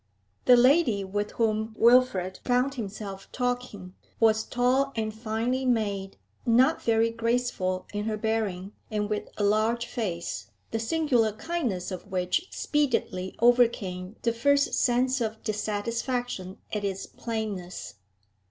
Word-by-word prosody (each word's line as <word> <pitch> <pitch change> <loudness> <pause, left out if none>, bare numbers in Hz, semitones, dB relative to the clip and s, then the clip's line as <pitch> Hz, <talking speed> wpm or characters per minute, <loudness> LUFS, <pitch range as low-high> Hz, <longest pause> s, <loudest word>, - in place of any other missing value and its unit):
The 250 -1 +8
lady 250 -5 +4
with 205 +2 -3
whom 220 -1 0
Wilfrid 230 -7 +4
found 250 +2 +2
himself 200 -4 -7
talking 245 -7 -3 0.3
was 220 -1 +4
tall 255 +4 +1
and 220 -1 -2
finely 225 +4 -1
made, 205 -6 -1 0.3
not 255 +6 +4
very 230 0 +2
graceful 230 -5 -1
in 205 0 -2
her 220 -1 -1
bearing, 210 -4 -1 0.2
and 210 -1 -2
with 210 - -2
a 210 - 0
large 220 +3 +2
face, 195 -9 -4 0.2
the 225 - -1
singular 240 -4 +2
kindness 220 - -3
of 185 +1 -6
which 185 - -1
speedily 235 -10 -1
overcame 225 -6 +2
the 235 - +2
first 280 +4 +2
sense 255 +1 +2
of 220 -1 -3
dissatisfaction 215 -1 -2 0.2
at 210 -1 -1
its 195 -1 -2
plainness. 210 - -5
225 Hz, 125 wpm, -27 LUFS, 205-245 Hz, 0.3 s, The